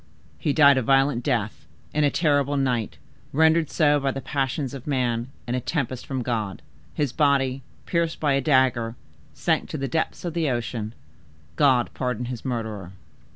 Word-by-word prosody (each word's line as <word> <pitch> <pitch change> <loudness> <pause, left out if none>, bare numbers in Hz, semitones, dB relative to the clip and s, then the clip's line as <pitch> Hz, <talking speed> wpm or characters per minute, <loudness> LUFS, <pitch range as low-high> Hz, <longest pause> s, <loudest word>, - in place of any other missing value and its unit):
"He 150 - 0
died 140 -2 +6
a - - 0
violent 135 0 +2
death, 115 -6 -2 0.3
in 150 - +2
a 145 - +4
terrible 145 -3 +1
night, 125 -6 -1 0.3
rendered 160 +1 +3
so 150 -3 +3
by 135 -1 0
the 135 - -3
passions 135 0 -2
of 135 -1 -8
man 125 -4 0 0.2
and 120 - -2
a - - 0
tempest 130 -2 -3
from 130 -2 -2
God. 110 -5 -3 0.3
His 145 -4 -1
body, 135 -3 +2 0.2
pierced 170 -2 0
by 145 -2 +2
a 135 - +2
dagger, 130 -5 +2 0.4
sank - - 0
to - - -4
the 135 - -2
depths 160 +6 -2
of 170 - -3
the 165 -4 0
ocean. 115 -2 -3 0.6
God 130 -5 +3
pardon 125 -2 -2
his 120 -2 -6
murderer!" 110 -7 -4
135 Hz, 170 wpm, -24 LUFS, 120-145 Hz, 0.6 s, died